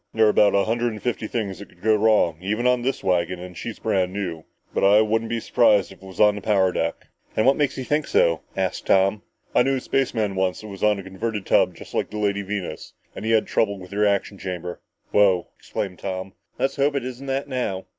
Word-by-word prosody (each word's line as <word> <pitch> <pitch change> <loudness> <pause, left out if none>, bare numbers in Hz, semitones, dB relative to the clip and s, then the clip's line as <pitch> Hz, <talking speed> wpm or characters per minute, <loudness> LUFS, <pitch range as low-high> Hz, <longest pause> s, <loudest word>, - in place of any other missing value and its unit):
"There 110 0 +5
are 105 -1 +4
a 100 - +4
hundred 120 +1 0
and 105 - -7
fifty 120 -3 -2
things 105 -5 -3
that 100 - -10
could - - -23
go 110 0 +4
wrong 105 -7 +3
even 105 +6 -1
on 125 -1 +3
this 130 +3 -2
wagon 90 -1 +1
and 90 0 -9
she's - - -6
brand 95 -1 0
new. 90 -5 -4 0.3
But - - 0
I 100 +2 +6
wouldn't 110 +1 0
be 115 0 -1
surprised 105 -4 +3
if 95 - -15
it - - -13
was 95 - -12
on 105 -1 +6
the 105 - -6
power 95 -3 +2
deck!" 85 -1 -2 0.3
"And 110 - +3
what 135 +1 +5
makes 145 -3 0
you 130 - -3
think 150 +3 0
so?" 85 -1 +3 0.2
asked - - -2
Tom. 95 +2 +3 0.3
"I - - +5
knew 135 +2 +2
a - - -1
spaceman 115 -6 0
once 95 -1 -1
that 110 - -9
was 100 -2 -9
on 105 -1 +3
a 100 - -7
converted 100 +2 -4
tub - - +3
just - - -12
like - - -1
the 105 - -6
Lady 100 -1 0
Venus 100 -2 -5 0.2
and - - -6
he - - -1
had 110 -1 +3
trouble 100 -2 0
with 90 0 -12
the 100 - -5
reaction 100 -1 +1
chamber." 90 -2 -5 0.3
"Wow!" 95 -4 +3
exclaimed 95 -3 -5
Tom. 95 0 -5 0.2
"Let's 135 +3 -1
hope 140 +1 +2
it 135 -3 -1
isn't 130 +2 -7
that 135 +1 -1
now!" 125 -8 -3
105 Hz, 240 wpm, -23 LUFS, 95-115 Hz, 0.3 s, I